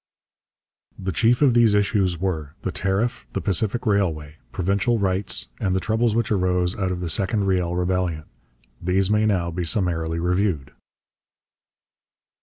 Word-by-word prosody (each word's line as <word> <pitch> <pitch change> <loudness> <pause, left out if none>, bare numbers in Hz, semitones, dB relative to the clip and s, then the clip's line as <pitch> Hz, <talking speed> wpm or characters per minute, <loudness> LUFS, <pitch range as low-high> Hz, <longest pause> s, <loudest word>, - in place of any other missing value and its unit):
The 95 0 -3
chief 120 - +2
of 135 -4 +5
these 115 -3 +4
issues 100 -4 +1
were: 80 -5 -3
the 95 - -2
Tariff, 100 +7 -1
the - - -1
Pacific 110 +4 -1
Railway, 80 -8 0
Provincial 100 - 0
Rights, 95 -1 0
and 95 -1 0
the - - +2
troubles 110 +2 0
which 115 -1 0
arose 90 -2 +1
out 95 -2 -1
of 90 -1 -4
the 90 - -3
second 100 +5 +1
Riel 90 -3 0
Rebellion. 90 -3 -1 0.6
These 95 +3 +1
may 105 0 +3
now 90 -5 0
be 90 +1 -3
summarily 85 -2 0
reviewed. 90 -3 0
95 Hz, 145 wpm, -23 LUFS, 90-105 Hz, 0.6 s, of